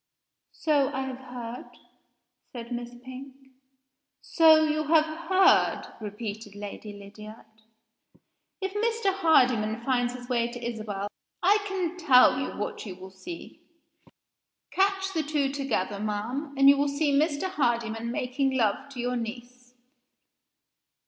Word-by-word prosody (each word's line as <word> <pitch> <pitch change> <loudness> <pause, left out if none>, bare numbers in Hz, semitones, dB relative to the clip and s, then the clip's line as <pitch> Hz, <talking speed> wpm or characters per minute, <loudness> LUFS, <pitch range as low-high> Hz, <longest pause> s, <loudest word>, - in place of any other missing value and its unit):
"So 290 -3 +2
I 265 - -2
have 265 -1 -5
heard," 245 -2 -8 0.8
said 235 -2 -8
Miss 240 0 -5
Pink. 260 +1 -9 0.9
"So 315 -2 +6
you 310 0 0
have 310 0 +4
heard?" 335 +5 +2
repeated 210 0 -6
Lady 205 +1 -7
Lydiard. 210 +2 -12 1.2
"If 385 0 -3
Mr. 445 -2 0
Hardyman 250 - +3
finds 245 -2 +1
his 245 -1 -9
way 240 -2 0
to 240 -1 -7
Isabel 215 -4 -4 0.4
I 405 +4 +5
can 365 -3 -2
tell 260 -6 +6
you 270 - -4
what 210 - -4
you 185 - -6
will 190 +1 -11
see. 335 - -10 1.1
Catch 385 0 +1
the 325 - +1
two 290 -2 0
together, 245 -8 -2
ma'am 230 +8 -3
and 275 0 +6
you 280 0 +8
will 285 0 +1
see 285 +1 0
Mr. 290 +1 +1
Hardyman 235 -8 -1
making 260 +2 -1
love 225 +4 0
to 250 - -8
your 245 +1 -1
niece." 245 +1 -7
255 Hz, 130 wpm, -27 LUFS, 230-310 Hz, 1.2 s, you